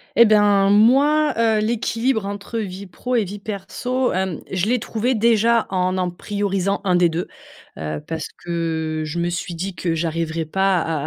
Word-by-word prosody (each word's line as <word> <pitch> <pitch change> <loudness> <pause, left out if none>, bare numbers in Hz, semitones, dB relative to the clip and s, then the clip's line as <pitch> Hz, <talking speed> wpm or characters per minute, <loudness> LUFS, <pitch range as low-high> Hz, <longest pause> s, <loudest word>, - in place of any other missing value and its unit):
Et 235 - +8
ben, 205 -2 +4
moi, 275 +8 +4
heu, 225 -2 +3
l'équilibre 225 0 0
entre 200 +3 -5
vie 195 -1 -5
pro 250 +8 -4
et 230 - +3
vie 200 +2 -7
perso, 245 +5 -2
hem, 185 -2 -2
je 190 +2 0
l'ai 250 - +2
trouvé, 230 +4 -1
déjà, 230 +1 +3
en 185 0 0
en 180 -1 -1
priorisant 200 +1 -2
1 185 -2 +2
des 175 -1 +4
2, 165 +2 -3 0.5
heu, 75 -1 -3
parce 160 -1 -4 0.2
que 160 -2 -2
je 155 +3 -5
me 170 0 0
suis 175 0 -4
dit 185 +3 -4
que 170 -1 -2
j'arriverai 165 0 -2
pas 190 +4 +1
à 165 - -2
195 Hz, 180 wpm, -21 LUFS, 175-225 Hz, 0.5 s, Et